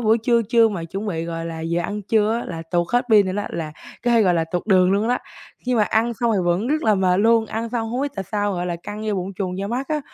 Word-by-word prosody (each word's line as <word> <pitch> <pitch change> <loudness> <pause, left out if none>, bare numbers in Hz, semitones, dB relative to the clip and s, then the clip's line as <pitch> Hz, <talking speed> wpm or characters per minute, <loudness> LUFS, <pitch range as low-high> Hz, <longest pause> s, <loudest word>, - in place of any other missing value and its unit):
buổi 225 0 +3
trưa 235 +1 +2
trưa 230 -2 +5
mà 180 -6 -4
chuẩn 195 +6 -5
bị, 165 -4 -2
gọi 165 0 -4
là, 165 -1 -5
giờ 170 +1 -1
ăn 205 +2 -4
trưa 215 +1 +2
á - - -6
là 165 -2 -5
tuột 175 -1 +1
hết 245 +1 +3
pin 205 -3 +6
nữa 185 - -2
đó, 205 +1 -2
là 155 -2 -4 0.3
cái, 235 -2 +4
gọi 180 -3 +3
là, 165 -1 +1
tuột 175 +4 -4
đường 185 -2 +4
luôn 210 +4 +1
đó. 250 - +2 0.5
Nhưng 250 -1 +1
mà - - +5
ăn 225 +3 +1
xong 235 -1 +2
thì - - +1
vẫn 175 +6 +1
rất 305 +3 0
là 215 -2 +4
mệt 185 -1 +2
luôn, 225 0 +4
ăn 225 +2 -3
xong 225 -1 -2
hông 255 +3 -1
biết 285 -1 -2
tại 195 -1 -4
sao, 205 -1 0
gọi 175 0 -2
là 170 -1 -2
căng 210 +1 -6
da 210 - 0
bụng 190 +1 -3
chùng 185 -1 -3
da 200 - -2
mắt 250 +5 -3
á, 305 -1 0
205 Hz, 300 wpm, -22 LUFS, 180-230 Hz, 0.5 s, pin